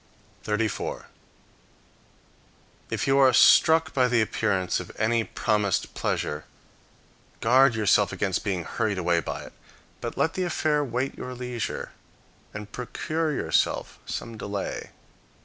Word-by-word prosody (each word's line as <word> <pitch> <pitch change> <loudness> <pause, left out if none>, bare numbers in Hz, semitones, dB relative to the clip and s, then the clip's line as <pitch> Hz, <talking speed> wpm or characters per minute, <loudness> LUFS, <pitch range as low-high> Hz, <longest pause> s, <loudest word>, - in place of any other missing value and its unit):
34. 110 0 -2 1.8
If - - -2
you 135 0 +3
are 135 -1 +7
struck 160 +3 +6
by 130 -2 +3
the 120 -1 +2
appearance 95 -4 0
of - - -8
any 115 +1 +2
promised 105 -4 0
pleasure, 75 +1 -2 0.9
guard 130 +2 +5
yourself 105 -2 +3
against 95 -3 -1
being 95 -5 -1
hurried 110 +2 -2
away 85 -1 +2
by - - -5
it; - - -12 0.5
but - - -5
let 160 - +1
the 185 - -3
affair 155 -4 +1
wait 130 +1 -2
your 125 0 -6
leisure, 125 -2 -4 0.6
and 105 0 -8
procure 155 +6 -2
yourself 145 - 0
some 115 -2 -5
delay. 100 -1 -4
115 Hz, 125 wpm, -26 LUFS, 105-135 Hz, 1.8 s, are